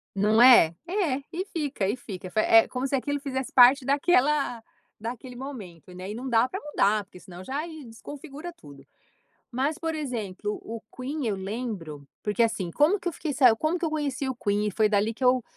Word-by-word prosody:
Não 210 +3 +3
é, 235 -10 +8
é 355 -8 0
e 360 +3 -3
fica 290 - -2
e 210 - 0
fica, 195 -7 -8
é - - -9
fi 215 - +2
É 225 0 +6
como 255 +1 -3
se 275 - 0
aquilo 285 +2 -2
fizesse 265 -2 -4
parte 255 +2 +7
daquela 280 -3 +2 0.4
daquele 245 +3 -7
momento, 200 - -9
né, 185 +2 -7
e 210 - -5
não 250 +3 -6
dá 235 0 +3
pra 385 - -4
mudar, 215 - +1
porque 185 -2 -15
senão 180 0 -11
já 285 - -4
e 315 -4 -10
desconfigura 290 +7 -9
tudo. 140 - -15 0.7
Mas, 275 +6 -1
por 325 -2 -3
exemplo, 220 -8 -4
o 225 0 -7
Queen, 275 +2 -4
eu 215 - 0
lembro, 190 - -5 0.2
porque 210 +2 +1
assim, 205 -6 0
como 315 - +3
que 355 - -2
eu 340 - -3
fiquei 305 -1 -4
sa 250 -5 +5
como 315 +6 0
que 345 - -1
eu - - -2
conheci 285 -3 -2
o 260 - -2
Queen 205 -1 0
e - - 0
foi 215 +2 +2
dali 210 +2 +1
que 255 - -4
eu 250 0 +4
250 Hz, 210 wpm, -26 LUFS, 210-290 Hz, 0.7 s, é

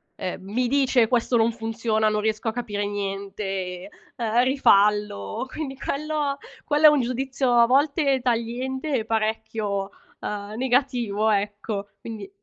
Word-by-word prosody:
ehm, 185 0 -5
mi 240 +6 -1
dice: 260 -3 +3
"Questo 240 0 +2
non 225 +1 +3
funziona, 225 -1 0
non 210 0 0
riesco 220 +1 -1
a - - -4
capire 210 -4 -3
niente, 195 -2 -4 0.3
ehm, 235 +1 +2
rifallo." 210 - +2
Quindi 285 -4 -5
quello 295 0 -2 0.3
quello 300 +1 +3
è - - +11
un 295 -3 +3
giudizio 255 +1 -1
a 235 -1 +6
volte 280 +1 +2
tagliente 255 +4 -2
e 220 - -5
parecchio, 220 -2 -1 0.3
uhm, 205 0 -5
negativo, 245 -5 +1
ecco. 205 0 -2
Quindi 210 -4 -8
225 Hz, 135 wpm, -24 LUFS, 205-260 Hz, 0.3 s, è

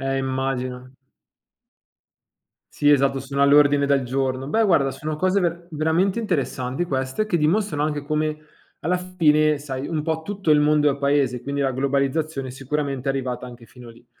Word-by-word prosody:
Eh, 135 0 -1
immagino. 130 -1 -3 1.8
Sì, 145 0 +2
esatto, 135 -1 +3
sono 140 +1 -4
all'ordine 145 0 +5
del 140 -2 +2
giorno. 130 +1 -2
Beh, 225 +10 +1
guarda, 155 -9 +3
sono 150 +3 -5
cose 185 +4 +1
ver 170 0 -2
veramente 165 +7 +1
interessanti 135 - -2
queste, 130 +5 -2
che 175 -5 0
dimostrano 160 0 +1
anche 150 -1 -1
come 155 0 -1 0.4
alla 180 +3 0
fine, 155 -4 +2
sai, 135 -1 -5
un 155 -2 -2
po' 160 0 -2
tutto 195 -2 -3
il 150 -1 +6
mondo 150 0 +3
è 140 - -4
paese, 140 -3 +1
quindi 140 +2 -2
la 135 - 0
globalizzazione 140 +1 -1
sicuramente 135 0 -3
è 135 - +2
arrivata 125 -2 -4
anche 120 -1 -12
fino 120 +1 -14
lì. 115 +1 -16
140 Hz, 165 wpm, -22 LUFS, 135-155 Hz, 1.8 s, il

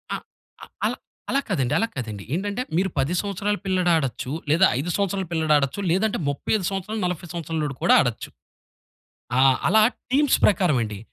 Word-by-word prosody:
ఆహ్, - - -7 0.4
ఆహ్ - - -25 0.2
అలా - - -3 0.3
అలా 275 - +2
కాదండి, 135 -9 0
అలా 225 - +1
కాదండి. 110 -6 -5
ఏంటంటే, 200 +7 -2 0.2
మీరు 190 +2 +1
10 135 +6 0
సంవత్సరాల 205 +1 -2
పిల్లాడాడచ్చు, 170 -9 0 0.2
లేదా 165 +6 +5
5 155 +6 -3
సంవత్సరాల 195 -1 -1
పిల్లాడాడచ్చు, 155 -1 +1
లేదంటే 205 +4 +1
35 180 +7 -1
సంవత్సరాలు, 195 +3 -4
40 180 -1 -3
సంవత్సరాలోడు 160 -4 -3
కూడా - - +5
ఆడచ్చు. - - -3 1.1
ఆ! - - +5 0.3
అలా 220 - +5 0.3
టీమ్స్ 290 0 +3
ప్రకారవండి. 135 - +2
175 Hz, 145 wpm, -23 LUFS, 145-200 Hz, 1.1 s, లేదా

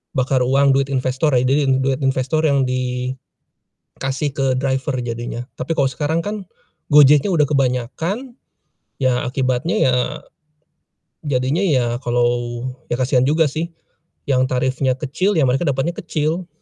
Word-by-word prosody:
bakar 130 0 +1
uang 135 +2 +3
duit 135 0 +2
investor 130 +1 0
ya, 125 - +3
jadi 135 +3 +2
d - - +3
duit 135 0 0
investor 135 +3 +1
yang 140 -2 +2
dikasih 125 0 -3 1.0
ke 135 0 -1
driver 135 +1 -1
jadinya. 120 0 -5 0.2
Tapi 145 +6 -2
kalo 140 - +3
sekarang 150 +5 -1
kan, 205 -3 -5 0.4
Gojeknya 145 +4 +6
udah 160 -5 +3
kebanyakan, 145 - -1 0.7
ya 130 -2 +2
akibatnya 130 - -1
ya 130 -1 +3 1.3
jadinya 140 +4 0
ya 125 -9 +1
kalau 120 0 +2 0.6
ya - - +1
kasian 130 0 +2
juga 155 +4 +3
sih 160 +4 -4 0.6
yang 130 -2 +3
tarifnya 130 +1 0
kecil, 155 +9 0
ya 145 - +4
mereka 130 +4 +1
dapetnya 145 +3 0
kecil. 165 +1 -2
135 Hz, 135 wpm, -19 LUFS, 130-150 Hz, 1.3 s, Gojeknya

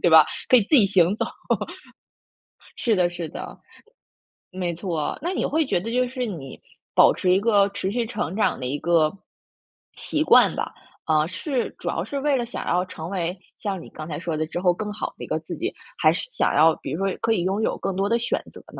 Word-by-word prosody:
对 175 - +3
吧？ 160 -1 +9 0.2
可 255 - +7
以 235 - +5
自 205 - 0
己 230 -8 +7
行 190 -1 +3
走。 - - -1 1.5
是 230 - +1
的 180 -2 +3
是 175 -2 -5
的。 - - -8 1.0
没 180 -2 -2
错， 165 -3 -3
那 340 - -2
你 375 - -1
会 315 +2 +1
觉 260 - +1
得 225 +6 -4
就 250 +1 +3
是 255 -1 -3
你 160 - -7 0.3
保 - - +6
持 180 - +1
一 185 - +5
个 205 -2 +3
持 200 -1 -3
续 235 +3 -1
成 220 -6 -3
长 215 - +1
的 130 - -4
一 135 +3 -1
个 165 -2 +3 0.9
习 305 - -2
惯 310 - +6
吧， - - -3 0.3
啊， 155 -1 +3
是 235 - -3
主 - - -8
要 - - -1
是 280 - -4
为 285 0 +2
了 245 -2 0
想 235 - -6
要 180 +1 +2
成 165 -3 -7
为 180 -1 -2 0.2
像 195 -5 -3
你 - - -11
刚 155 - -7
才 160 - -5
说 170 -2 -3
的， 155 +1 -1
之 170 +2 -4
后 180 -1 +3
更 210 +3 -4
好 210 - -4
的 - - -8
一 - - -6
个 - - -1
自 - - -7
己， - - -3 0.2
还 - - +5
是 - - -3
想 - - +1
要 160 +1 +5
比 - - -5
如 195 +5 -1
说 190 - -2
可 230 0 +1
以 195 -6 +2
拥 195 +4 0
有 - - 0
更 195 - -3
多 195 +2 0
的 235 +1 +2
选 235 - -1
择 - - -12
呢？ - - -20
190 Hz, 250 characters per minute, -24 LUFS, 170-230 Hz, 1.5 s, 吧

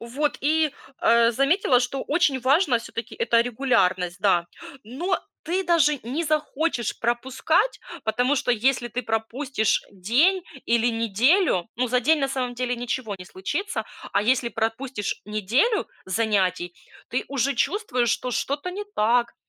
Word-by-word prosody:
Вот, 265 +6 -2
и, 310 0 +2 0.3
а, 235 0 +4
заметила, 275 - +3
что 260 +2 -2
очень 290 -4 +1
важно 270 -1 +3
все-таки 230 0 -7
это 230 0 +2
регулярность, 195 -8 +1
да, 175 -4 +3 0.4
но 335 - -2 0.3
ты 365 +3 0
даже 305 -5 +3
не 280 +9 -3
захочешь 305 -4 -1
пропускать. 265 - 0 0.3
Потому 245 +6 +1
что, 250 - 0
если 240 +1 +1
ты 250 +2 -4
пропустишь 225 +2 -1
день 265 - +2 0.2
или 235 0 +2
неделю, 230 - +2
ну, 250 +1 +1
за 250 +1 +1
день, 310 +5 +3
на 275 - 0
самом 255 -2 -2
деле, 250 0 -1
ничего 240 -2 -3
не 180 - -10
случится. 290 - -3 0.3
А 200 - +3
если 245 +1 +2
пропустишь 225 0 -3
неделю 225 - +1 0.2
занятий, 190 -4 0 0.3
ты 250 - -2
уже 275 0 0
чувствуешь, 255 - 0
что 250 +2 -1
что-то 290 +8 -2
не 410 +3 -5
так. 235 +2 +2
250 Hz, 140 wpm, -24 LUFS, 225-290 Hz, 0.4 s, а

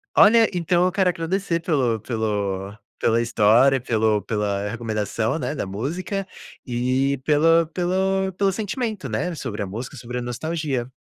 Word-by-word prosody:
olha, 225 +1 +7
então 175 +1 +2
eu 185 - +2
quero 190 -1 +2
agradecer 170 +1 -1
pelo 130 -9 +1
pelo 100 -3 -2 0.2
pela 115 0 +2
história, 115 +4 +4
pelo 110 -3 +1
pela 105 -1 -1
recomendação, 110 +3 -2
né, 150 - -3
da - - -3
música 170 - -3 0.4
e, 130 +3 0
pela 165 +2 +4
pelo 190 +3 0
pelo 195 +2 +1
sentimento, 215 +1 -3
né, 180 0 -2
sobre 115 -9 -4
a - - -5
música, 115 +7 -7
sobre 125 +1 -5
a - - -4
nostalgia. 130 +1 -3
135 Hz, 145 wpm, -23 LUFS, 110-180 Hz, 0.4 s, olha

